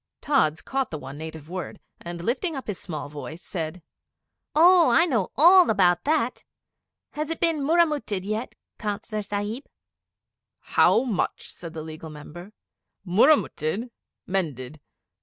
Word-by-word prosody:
Tods 165 - +1
caught 270 -1 -2
the 155 - -5
one 135 -1 -9
native 160 -1 -8
word, 185 +1 -6 0.2
and 170 0 -7
lifting 275 - -1
up 270 - -6
his 205 -4 -4
small 155 -6 -5
voice 150 +4 -8
said 165 -1 -5 0.7
'Oh, 345 +2 +7
I 335 - +5
know 230 - 0
all 355 +4 +7
about 180 -4 +3
that! 290 -5 0 0.7
Has 305 +1 -4
it 330 - -3
been 325 -3 +1
murramutted 295 - +1
yet, 215 +4 -3 0.2
Councillor 210 0 -3
Sahib?' 205 +5 -4 0.9
'How 230 - +3
much?' 230 -8 -2
said 165 -2 -9
the 160 -2 -6
Legal 160 0 -8
Member. 155 +5 -10 0.5
'Murramutted 220 - +2 0.3
mended. 155 -7 -3
205 Hz, 135 wpm, -25 LUFS, -, 0.9 s, Oh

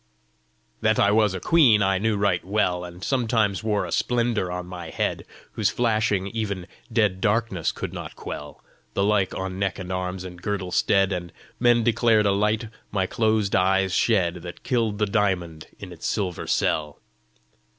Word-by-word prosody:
"That - - +2
I 100 - +4
was 105 -2 +3
a - - -3
queen 120 - +5
I 95 0 +2
knew 110 +1 +1
right 100 -4 +1
well, 90 -3 0
And 90 +1 -9
sometimes 110 -6 +1
wore 105 -2 0
a - - -7
splendour 115 -6 0
on 90 0 -4
my 90 -2 -8
head - - -2 0.3
Whose - - +1
flashing 110 -4 +1
even 100 -5 -3 0.3
dead 105 -5 +1
darkness 105 -5 +1
could - - -6
not - - -7
quell - - -8 0.3
The 100 - +2
like 100 -2 +1
on 95 0 -4
neck 100 -2 -1
and 95 -1 -6
arms 90 0 -3
and 90 -1 -9
girdle 95 -3 -3
stead; 95 +1 +3
And 85 -1 -5 0.3
men 120 -1 +4
declared 115 -2 +3
a 100 - +4
light 105 +3 +1 0.2
my 95 -2 0
closed 110 0 +1
eyes 95 0 +2
shed 90 -7 +2
That 85 0 -9
killed 115 -5 0
the 105 - +2
diamond 95 -6 -1
in 95 -2 -9
its 80 - -5
silver 95 -5 -2
cell." 75 -2 0
100 Hz, 170 wpm, -24 LUFS, 90-110 Hz, 0.3 s, queen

